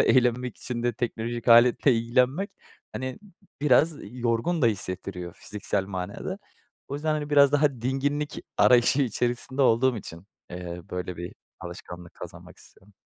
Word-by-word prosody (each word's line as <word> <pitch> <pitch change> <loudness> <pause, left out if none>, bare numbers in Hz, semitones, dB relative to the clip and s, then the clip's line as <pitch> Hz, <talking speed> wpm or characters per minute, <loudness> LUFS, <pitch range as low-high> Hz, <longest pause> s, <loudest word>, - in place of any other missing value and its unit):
eğlenmek 125 -1 +2
için 120 -2 -4
de 120 0 +1
teknolojik 120 0 -3
aletle 120 +3 +6
ilgilenmek, 125 - +1 0.4
hani, 130 0 -5
b - - -16 0.4
biraz 150 +3 +4
yorgun 120 - -1
da - - +6
hissettiriyor 90 -3 -3
fiziksel 100 -1 -3
manada. 90 -2 -5 0.5
O 140 - -4
yüzden, 155 +2 -1
hani, 150 -1 -4
biraz 140 -1 +6
daha 145 0 +4
dinginlik 145 +3 -1 0.2
arayışı 125 +3 +5
içerisinde 125 +2 -1
olduğum 125 +1 +3
için, 85 -3 -9 0.2
eee, 90 -1 -6
böyle 90 -1 -4
bir 85 +1 -7 0.3
alışkanlık 90 0 -9
kazanmak - - -11
istiyorum. 100 +1 -15
120 Hz, 140 wpm, -26 LUFS, 100-135 Hz, 0.5 s, aletle